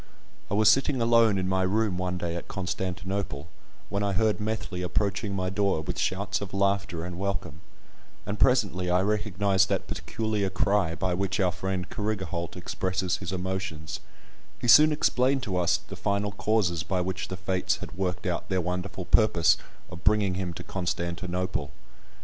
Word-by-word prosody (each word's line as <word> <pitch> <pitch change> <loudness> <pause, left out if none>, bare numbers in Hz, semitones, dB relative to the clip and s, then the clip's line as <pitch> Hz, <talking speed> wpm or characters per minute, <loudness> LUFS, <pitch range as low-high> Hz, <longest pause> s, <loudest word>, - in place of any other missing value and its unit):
I 100 - 0
was 110 0 +4
sitting 135 +4 +4
alone 115 -3 +4
in 95 -1 -1
my 95 0 +1
room 95 0 +1
one 90 0 -1
day 85 -1 -3
at 85 - -6
Constantinople, 95 -3 -3 0.4
when 100 - -1
I 100 -1 0
heard 110 +2 +2
Methley 105 -3 -3
approaching 100 +3 -1
my 95 -1 -1
door 100 -4 +1
with 90 +3 -4
shouts 100 +2 -1
of 100 -1 -5
laughter 100 -3 0
and 90 0 -6
welcome, 95 -6 -3 0.6
and 100 +1 -4
presently 100 -8 +3
I 90 +1 +3
recognised 100 -2 +2
that - - 0
peculiar 110 -3 -2
cry 95 -3 +1
by 90 +3 -1
which 95 +2 -1
our 90 -2 +3
friend 95 0 -3
Carrigaholt 95 -6 -3
expresses 95 0 -1
his 95 -2 -5
emotions; 95 -4 -3 0.6
he - - -4
soon 150 +6 +8
explained 135 -2 +2
to 100 -7 -2
us 90 -1 +3
the 95 - -10
final 100 +1 -1
causes 100 -5 +1
by 95 +4 -1
which 95 +1 -2
the 95 - -5
fates 95 -1 0
had 90 - -8
worked 95 +1 -2
out 90 -2 -2
their 95 -1 +1
wonderful 90 +1 -3
purpose 85 -7 +4 0.4
of 85 -2 -9
bringing 105 -2 +3
him 90 -1 -2
to - - -7
Constantinople. 90 -3 -2
95 Hz, 165 wpm, -27 LUFS, 90-105 Hz, 0.6 s, soon